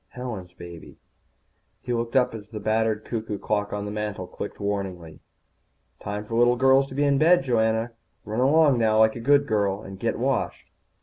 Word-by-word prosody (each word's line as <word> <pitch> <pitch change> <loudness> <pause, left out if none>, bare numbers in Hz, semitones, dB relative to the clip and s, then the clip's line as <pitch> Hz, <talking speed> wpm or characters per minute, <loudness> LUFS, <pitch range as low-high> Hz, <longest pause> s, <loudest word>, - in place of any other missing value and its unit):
Helen's 110 -8 -7
baby._ 85 -2 -11 0.9
He 125 - -2
looked 115 0 -3
up 125 -2 +3
as 105 -2 -9
the 110 -1 -6
battered 110 0 0
cuckoo 110 -3 -4
clock 105 0 -2
on 105 0 -3
the 105 - -5
mantel 105 -3 -4
clicked 90 +3 -8
warningly. 95 -6 -4 0.8
"Time 105 +1 -5
for 115 - -8
little 120 +1 +4
girls 135 +2 +4
to 130 - -10
be 145 - +1
in 140 -1 +2
bed, 170 +1 +5
Joanna. 115 -2 +1 0.3
Run 110 +2 -3
along 140 0 +4
now 110 -1 +2
like 110 0 +4
a - - -6
good 140 +4 +3
girl, 105 -3 0
and 95 0 -10
get - - -1
washed." - - -2
110 Hz, 185 wpm, -25 LUFS, 105-125 Hz, 0.9 s, bed